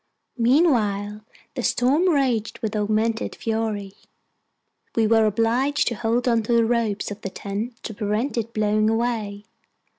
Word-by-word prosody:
Meanwhile 220 - +2 0.3
the 255 - -3
storm 280 +10 +2
raged 255 -8 +1
with 220 0 -2
augmented 215 +2 0
fury. 220 -3 -2 1.0
We 225 - +3
were 220 0 +4
obliged 235 +7 +1
to - - -3
hold 235 +3 0
on 230 -2 +3
to 225 +2 -1
the 230 -1 +4
ropes 225 -4 0
of 205 +1 -7
the 195 - -4
tent 205 +5 -5
to 220 - -5
prevent 215 +6 -1
it 230 -1 -2
blowing 215 0 +1
away. 220 -3 -2
225 Hz, 145 wpm, -23 LUFS, 210-240 Hz, 1.0 s, were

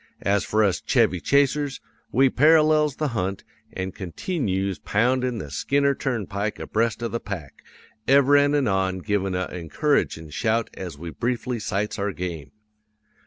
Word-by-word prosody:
As 100 +1 +2
for 110 0 +1
us 100 -3 +1
Chevy 90 - +2
Chasers, 140 - +1 0.3
we 135 +3 +4
parallels 155 +1 +4
the 155 -2 -1
hunt, 95 -5 -3 0.3
an' 95 0 -4
continyoos 95 - -3
poundin' 125 +3 +1
the 75 -9 -7
Skinner 140 - +1
turnpike 105 -6 -3
abreast 115 +2 -1
of 115 - -2
the 115 - -2
pack, 90 - -7 0.5
ever 140 +1 +5
an' 145 0 +4
anon 95 -8 +1
givin' 100 -3 -1
a 90 0 -1
encouragin' 85 - -1
shout 115 +6 0
as 90 -6 -7
we 85 +2 -7
briefly 120 +2 -2
sights 105 +1 -2
our 100 0 -1
game. 85 -6 -5
110 Hz, 145 wpm, -24 LUFS, 95-135 Hz, 0.5 s, ever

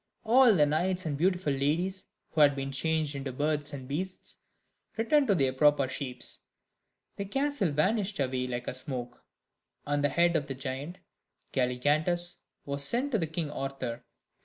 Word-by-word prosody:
All 240 0 +6
the 150 -4 +5
knights 180 +5 0
and 150 -3 -1
beautiful 180 -1 +1
ladies, 170 +8 -1 0.2
who 155 - +2
had 145 -1 +6
been 135 0 -3
changed 155 +2 0
into 140 -1 -4
birds 150 +2 -1
and 135 -3 -7
beasts, 180 +7 -5 0.6
returned 275 +5 +3
to 200 - +4
their 135 -5 +2
proper 145 0 +4
shapes. 130 -1 -4 0.8
The 200 - -3
castle 270 - 0
vanished 195 +6 +1
away 130 -2 0
like 125 0 -4
smoke, 125 -2 -6 0.6
and 145 0 0
the 145 - +4
head 170 0 +3
of 145 -3 0
the 135 - -4
giant 135 +6 -5 0.6
Galligantus 150 +7 +1 0.3
was 140 0 -1
sent 250 - 0
to 195 -10 +1
King 160 -1 -3
Arthur. 135 -4 -4
150 Hz, 155 wpm, -29 LUFS, 135-185 Hz, 0.8 s, All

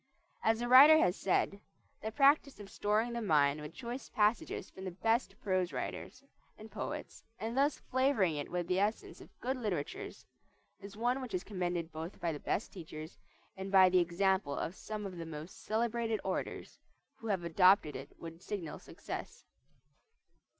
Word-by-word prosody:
As 225 +1 +2
a 240 - -1
writer 280 +5 +10
has 180 - +3
said, 195 +1 0 0.4
"The 220 - -3
practise 280 +1 +3
of 200 -1 -10
storing 215 +3 0
the 235 - -2
mind 150 -6 +3
with 150 +2 -8
choice 245 +2 -6
passages 210 +2 +1
from 190 - -11
the 190 - -3
best 230 +2 +1
prose 185 -3 +1
writers 255 - -5 0.3
and 215 +1 -12
poets, - - -6
and 225 +2 -4
thus 280 +2 +2
flavoring 260 - +1
it 145 -1 -4
with 175 -1 -2
the 185 +1 +1
essence 210 +3 -2
of - - -13
good 260 +2 -1
literatures, 225 - -4 0.6
is 200 +1 -10
one 245 +4 0
which 250 -7 -4
is 180 - -2
commended 175 -4 -3
both 160 +4 -7
by 170 - -1
the 150 - -5
best 205 - -2
teachers 160 -4 -9 0.4
and 190 0 -6
by 190 -1 +7
the 180 0 +4
example 180 -2 +1
of 170 - -3
some 210 +1 -6
of 185 -2 -6
the 165 - -5
most 155 +2 -9
celebrated 225 0 0
orators, 190 - -4 0.4
who 225 - -7
have 195 -5 0
adopted 180 -1 +4
it 135 +2 -7
with 165 0 -9
signal 185 -6 -5
success." - - -8
200 Hz, 170 wpm, -33 LUFS, 175-230 Hz, 0.6 s, writer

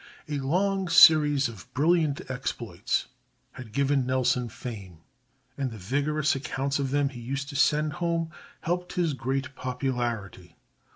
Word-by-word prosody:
A 145 -1 -2
long 190 +7 0
series 150 -4 +7
of 110 -5 -11
brilliant 155 -1 +2
exploits 130 0 -2 0.5
had 120 -4 -10
given 140 +1 +1
Nelson 125 -1 +1
fame, 105 -7 -8 0.6
and 135 -2 0
the 115 - -9
vigorous 145 +9 0
accounts 135 0 -2
of 135 -1 -1
them 145 0 +1
he 125 -3 -10
used 135 +3 -4
to 145 - -8
send 150 +1 +2
home 165 -1 -1 0.3
helped 180 +1 -2
his 170 -4 +1
great 135 +1 -3
popularity. 120 -9 -3
135 Hz, 135 wpm, -27 LUFS, 125-150 Hz, 0.6 s, series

